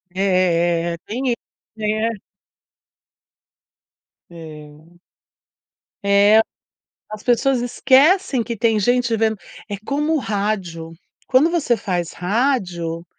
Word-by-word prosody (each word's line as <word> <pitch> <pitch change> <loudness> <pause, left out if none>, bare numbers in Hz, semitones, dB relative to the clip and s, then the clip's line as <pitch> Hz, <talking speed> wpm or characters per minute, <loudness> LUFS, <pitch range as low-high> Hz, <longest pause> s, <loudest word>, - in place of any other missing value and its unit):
É. 175 -3 +1
Tem 255 +5 -3
isso, 235 - 0 0.4
né? 215 0 -1 2.1
É. 155 0 -13 1.1
É. 200 +2 +5 0.7
As 215 0 -8
pessoas 250 +1 +2
esquecem 265 - +3
que 235 -1 -5
tem 225 0 +2
gente 245 +2 +1
vendo, 220 -1 0 0.3
é 200 - -3
como 295 +4 0
o - - +1
rádio. 195 -8 -3 0.4
Quando 270 +6 +4
você 290 -9 +1
faz 180 -4 -3
rádio, 180 -6 -1
215 Hz, 95 wpm, -20 LUFS, 175-245 Hz, 2.1 s, É